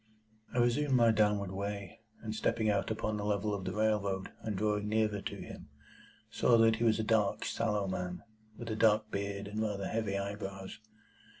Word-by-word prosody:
I - - -5
resumed 130 +3 +3
my 115 -2 +6
downward 105 -3 +2
way, 100 +1 -5 0.2
and 110 -1 -3
stepping 110 0 +1
out 100 -1 0
upon 110 -1 -2
the 105 - -3
level 105 0 0
of 95 -2 -4
the - - -3
railroad, 100 -3 0
and 105 -3 -3
drawing 105 0 0
nearer 110 -2 +1
to - - -5
him, - - -9 0.6
saw 120 - +4
that 115 -1 +5
he 115 - -1
was 110 -2 +4
a - - +1
dark, 105 -2 +1
sallow 105 -3 0
man, 90 -1 -4 0.3
with 115 -2 -5
a - - -1
dark 110 -1 +3
beard 100 0 -3
and 105 +1 -3
rather 100 -3 -2
heavy 110 -3 -1
eyebrows. 100 -1 -5
105 Hz, 185 wpm, -32 LUFS, 100-110 Hz, 0.6 s, my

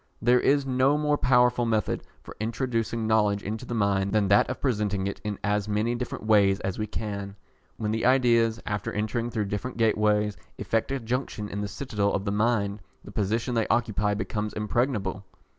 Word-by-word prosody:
There 125 +2 +4
is 140 +1 +2
no 130 +2 +2
more 150 0 +2
powerful 125 -2 +3
method 110 -2 0 0.2
for - - -11
introducing 115 0 -2
knowledge 105 -2 +2
into 110 +4 -5
the 120 - -3
mind 100 -2 +1
than 105 -3 +2
that 100 - +4
of 130 - -4
presenting 105 -6 0
it 100 - -4
in 105 -2 -3
as 105 0 0
many 105 +3 +1
different 120 -2 -5
ways 100 -3 +4
as 95 +1 -3
we 110 - -1
can. 100 -2 -5 0.4
When 105 -1 -2
the 110 +1 -1
ideas, 115 -3 +3
after 105 -2 -3
entering 115 +3 -2
through 110 -3 -1
different 105 +6 -4
gateways, 105 -2 +2 0.2
effect 115 +2 -1
a 135 - -1
junction 115 -3 -3
in 100 - -4
the 105 - -2
citadel 105 -3 -2
of 100 - -1
the 100 - 0
mind, 105 -1 +1 0.2
the - - -11
position 110 +5 -1
they 115 -2 +1
occupy 105 -3 +1
becomes 105 +1 -3
impregnable. 105 -3 -1
110 Hz, 185 wpm, -26 LUFS, 105-120 Hz, 0.4 s, There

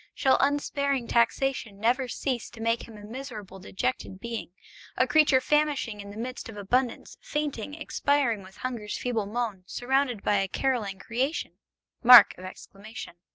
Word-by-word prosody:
Shall 265 - +3
unsparing 280 -2 0
taxation 235 -2 +1
never 245 +4 +1
cease 250 -1 -3
to 230 - -14
make 230 +1 -1
him 225 -2 -12
a 205 - -12
miserable 215 -4 -8
dejected 185 0 -3
being, 230 -2 -5 0.5
a 255 - +4
creature 290 0 +5
famishing 280 -6 0
in 200 - -10
the 205 - -10
midst 250 +1 -5
of 215 - -9
abundance, 245 +5 -1
fainting, 290 -3 -3
expiring 285 -7 0
with 190 0 -15
hunger's 235 -5 -4
feeble 230 -5 -2
moan, 220 -3 -3
surrounded 255 -3 0
by 205 - +2
a 195 0 +1
carolling 220 -4 -1
creation! 255 - -3
240 Hz, 140 wpm, -27 LUFS, 210-270 Hz, 0.5 s, creature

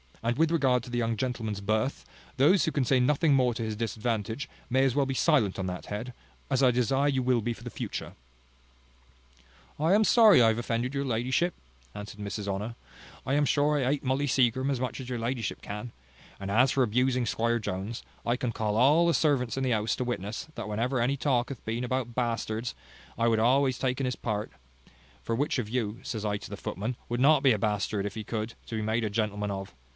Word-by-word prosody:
And 120 +1 0
with 160 +1 +3
regard 130 -7 +2
to 125 - -9
the 120 0 -1
young 115 -1 0
gentleman's 110 -4 -3
birth, 110 +6 -1 0.3
those 150 +9 +5
who 160 - 0
can 140 -4 0
say 130 +1 +3
nothing 145 +4 +3
more 125 -3 +3
to 115 - -3
his 110 -1 -3
disadvantage, 115 +3 -2 0.2
may 130 +2 +3
as 135 -3 +2
well 140 -1 +3
be 135 - -1
silent 130 - +2
on 95 - -2
that 90 0 -5
head, 115 +5 -5 0.4
as 135 -1 +1
I 130 - +6
desire 125 +3 +2
you 135 -3 +1
will 125 -2 +2
be 120 +2 -1
for - - -14
the - - -6
future." - - -5 1.7
"I 160 +5 +3
am 215 +2 +5
sorry 215 - +7
I 115 - +6
have 110 +1 0
offended 120 +2 -2
your 140 0 -1
ladyship," 130 +8 0 0.4
answered 105 0 -8
Mrs 100 0 -4
Honour. 105 +4 -3 0.5
"I 135 - +1
am 145 +1 +3
sure 145 +2 +2
I - - 0
hate 145 - -1
Molly 135 +2 0
Seagrim 130 0 +2
as 135 - -1
much 130 +2 -3
as 130 -1 -7
your 125 - -2
ladyship 115 -1 -3
can; 105 +4 -6 0.5
and 100 0 -4
as 125 +5 +4
for 135 - +3
abusing 125 +2 +1
Squire 115 +1 +1
Jones, 100 +2 -4 0.2
I 120 - +1
can 125 -2 -2
call 105 -2 -1
all 150 +8 +5
the 170 - +3
servants 135 -6 +1
in 135 - 0
the 130 - +1
house 110 -1 +1
to 125 - -1
witness, 115 -1 -4
that 105 - -6
whenever 120 +5 0
any 130 +4 +1
talk 130 -3 +1
hath 135 -5 -8
been 115 +2 -2
about 125 -1 -2
bastards, 115 -1 -2 0.4
I 115 +1 +2
have 115 -1 +3
always 130 +2 +3
taken 130 0 0
his 125 - -1
part; 105 -2 -3 0.7
for 115 - -1
which 140 +5 0
of 115 -5 -2
you, 115 -2 -2
says 110 -2 -4
I 100 -1 0
to - - -10
the - - -6
footmen, 110 +7 -4
would 120 0 -1
not 140 +2 +5
be 135 -3 +6
a 105 - -1
bastard, 105 -1 -1
if 105 - -3
he 110 - -4
could, 110 +1 -4
to 115 - -5
be 110 - -2
made 110 +2 0
a 110 - 0
gentleman 105 -1 -1
of? 95 0 -6
120 Hz, 225 wpm, -28 LUFS, 110-135 Hz, 1.7 s, sorry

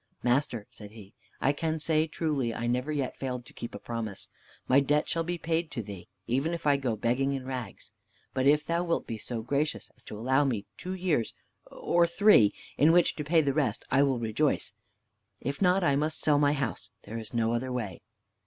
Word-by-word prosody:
"Master," 120 -3 +1
said 105 -2 -11
he, 105 -2 -13 0.3
"I 140 - +2
can 160 +2 -1
say 155 0 +1
truly, 145 -7 -1
I 120 - -3
never 125 +5 0
yet 140 -4 -2
failed 125 -2 -4
to - - -14
keep 115 - -7
a - - -3
promise. 115 -4 -5 0.4
My 130 - +6
debt 145 +2 +1
shall 165 - 0
be 175 +1 -3
paid 165 0 -1
to 130 -6 -4
thee, 100 -3 -9 0.2
even 135 - 0
if 170 - -9
I 145 -1 +5
go 130 -5 -1
begging 125 +6 +1
in 135 -2 -4
rags. 130 -3 -6 0.4
But 130 +1 +1
if 150 +1 +4
thou 170 +1 0
wilt 170 -1 -1
be 115 -1 -5
so 115 +1 -4
gracious 140 +5 -1
as 120 - -13
to 105 - -7
allow 130 +6 +2
me 115 -7 -1
two 185 - -5
years, 175 -11 0 0.3
or 170 0 +2
three, 170 - +6 0.3
in 150 +3 +6
which 175 0 +4
to 150 - -2
pay 160 +2 +4
the, 140 -2 0
rest, 145 -2 0
I 135 - +5
will 135 -3 +2
rejoice. 115 +6 0 0.7
If 140 +6 -4
not, 185 0 +4
I 140 -4 +3
must 155 +2 -1
sell 145 -2 +4
my 145 0 +4
house; 140 -6 -3
there 115 +1 -6
is 110 +1 -8
no 115 0 +2
other 130 +2 -2
way." 110 -9 -4
135 Hz, 210 wpm, -29 LUFS, 120-155 Hz, 0.7 s, My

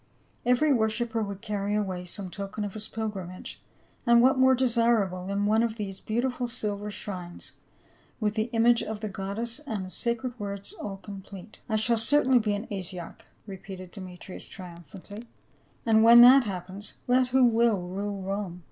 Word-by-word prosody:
Every 275 +4 +4
worshiper 225 0 0
would 200 -2 -5
carry 205 -1 -2
away 190 -4 -2
some 185 +1 -6
token 200 +2 -4
of 200 - -6
his 215 0 -3
pilgrim 210 -5 -4
age, 185 - -9 0.4
and 235 0 +5
what 255 +3 +5
more 260 0 +6
desircable 230 -7 +1
than 200 +1 0
one 215 +2 +3
of 230 -2 0
these 195 -3 -5
beauti 240 +4 -1
ful 245 0 -3
silver 210 -4 -4
shrines, 185 -4 -7 0.6
with 210 -2 0
the 215 0 0
image 235 0 +4
of 215 -1 -5
the 215 - -3
goddess 200 +6 -3
and 220 -11 -4
the 185 - -10
sacred 235 +2 -2
words 200 - -5
all 205 - -6
complete. 195 +1 -11
"I 220 - +1
shall 230 +2 +2
certainly 260 +1 +4
be 210 -2 0
an 205 +3 -5
Asiarch," 185 -3 -6 0.3
repeated 190 -2 -9
Deme 185 -3 -9
trius 185 +1 -9
triumphantly, 185 - -11 0.6
"and 220 -1 +5
when 235 +1 +9
that 255 +1 +8
happens, 190 +1 -6
let 250 +1 +4
who 255 0 +4
will 225 -6 +2
rule 200 +1 -4
Rome 195 -2 -4
210 Hz, 175 wpm, -27 LUFS, 195-235 Hz, 0.6 s, when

